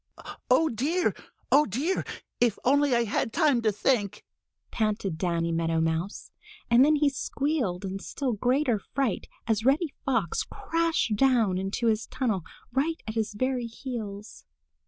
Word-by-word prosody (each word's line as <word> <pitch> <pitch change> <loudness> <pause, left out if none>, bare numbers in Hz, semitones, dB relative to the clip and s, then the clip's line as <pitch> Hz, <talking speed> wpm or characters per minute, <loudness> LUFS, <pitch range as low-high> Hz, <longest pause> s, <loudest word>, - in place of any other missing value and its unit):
"Oh, 290 +6 +5
dear! 310 +9 0 0.4
Oh, 290 +3 +6
dear! 280 - -1 0.4
If 235 -4 +2
only 280 0 +4
I 235 - +3
had 225 +1 -1
time 290 -4 +3
to 220 -2 +2
think!" 210 -1 0 0.5
panted 210 -5 -1
Danny 170 -2 0
Meadow 165 0 0
Mouse, 160 +4 -2 0.4
and 240 +2 +7
then 305 +2 +5
he 295 0 +3
squealed 275 - -1
in 195 +1 -4
still 255 +5 -3
greater 245 +1 +1
fright 255 +1 -2 0.2
as 220 -2 0
Reddy 280 +4 +2
Fox 230 - 0
crashed 330 -9 -1
down 225 -6 +3
into 195 +5 -2
his 220 -1 +1
tunnel 230 -8 -1 0.3
right 310 +5 +1
at 220 - -4
his 220 -2 -2
very 255 +1 -1
heels. 220 - -7
235 Hz, 145 wpm, -27 LUFS, 205-275 Hz, 0.5 s, and